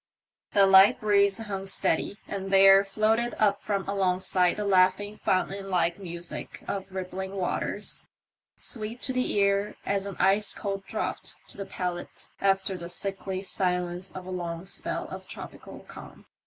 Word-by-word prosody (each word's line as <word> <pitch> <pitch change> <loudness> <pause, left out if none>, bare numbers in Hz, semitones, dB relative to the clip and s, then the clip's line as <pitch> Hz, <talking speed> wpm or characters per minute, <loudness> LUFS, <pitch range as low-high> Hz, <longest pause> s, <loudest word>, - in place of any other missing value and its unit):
The 200 -1 +7
light 195 +1 +7
breeze 200 -2 +3
hung 195 -3 -5
steady, 195 +1 0
and 195 -1 -4
there 195 0 +7
floated 220 +4 +1
up 205 -2 +2
from 200 -2 -2
alongside 185 -2 +2
the 210 - -2
laughing 190 +2 +3
fountainlike 190 -2 0
music 175 -2 -7
of 195 -1 -4
rippling 190 +1 -4
waters, 185 -2 -3 0.5
sweet 225 0 -4
to 260 - -1
the 255 0 0
ear 200 0 +2
as 200 0 0
an 195 - -6
ice 200 +2 +2
cold 195 -1 -4
draught - - -3
to - - -9
the 195 - -5
palate 180 -1 -5
after 195 0 +2
the 170 0 -6
sickly 195 0 -3
silence 180 -1 -1
of 185 -1 -8
a 185 - -6
long 170 -1 -4
spell 190 - -3
of - - -8
tropical - - -9
calm. - - -12
195 Hz, 150 wpm, -27 LUFS, 185-200 Hz, 0.5 s, The